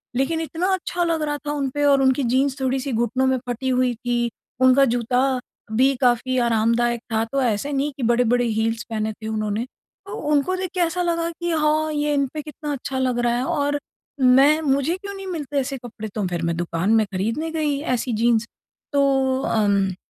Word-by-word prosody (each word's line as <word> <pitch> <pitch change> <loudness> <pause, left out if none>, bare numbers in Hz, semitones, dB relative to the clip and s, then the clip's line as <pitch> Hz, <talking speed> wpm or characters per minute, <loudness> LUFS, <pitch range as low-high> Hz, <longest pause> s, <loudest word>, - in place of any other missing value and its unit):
लेकिन 315 +6 0
इतना 325 +3 -2
अच्छा 355 -1 -1
लग 330 -2 0
रहा 295 -1 -1
था - - 0
उन 280 -2 -1
पे 290 - 0
और 280 -1 +5
उनकी 265 +1 +3
जीन्स 270 +1 +1
थोड़ी-सी 265 +1 -1
घुटनों 240 +3 +1
में 260 0 +2
फटी 245 +2 -2
हुई 255 -1 +2
थी, 240 0 -1 0.3
उनका 260 +1 +6
जूता 250 +2 +1 0.3
भी 260 +5 +3
काफ़ी 250 +1 +2
आरामदायक 235 +1 +1
था। 220 0 +2
तो 275 0 +1
ऐसे 245 +3 0
नहीं 280 +2 0
कि 265 - -4
बड़े-बड़े 240 +1 +2
हील्स 225 0 -1
पहने 220 -1 -2
थे 220 +1 -9
उन्होंने। 215 +1 -2
तो 395 +9 -16 0.2
उनको 295 +5 +2
देख 370 0 -3
के 365 - -3
ऐसा 350 +1 +1
लगा 335 -1 0
कि 345 +1 -4
हाँ 310 0 +1
ये 295 0 0
इन 280 -1 +2
पे 305 - -3
कितना 300 0 -6
अच्छा 270 -1 -4
लग 255 -2 0
रहा 240 - +2
है 250 - -1
और 290 +1 0 0.4
मैं 270 +4 +6
मुझे 280 +6 +1
क्यों 400 +1 -7
नहीं 390 -1 -8
मिलते 295 -6 -2
ऐसे 270 +1 -3
कपड़े 235 -3 -8
तो 210 -3 -1
फ़िर 175 -1 -3
मैं 170 0 -1
दुकान 175 +3 -1
में 220 -1 +4
खरीदने 230 +13 -2
गई 300 -3 -1 0.2
ऐसी 245 0 -2
जीन्स 235 -1 +3 0.5
तो 270 -2 +2
अम 200 -3 +1
260 Hz, 200 wpm, -22 LUFS, 235-295 Hz, 0.5 s, उनका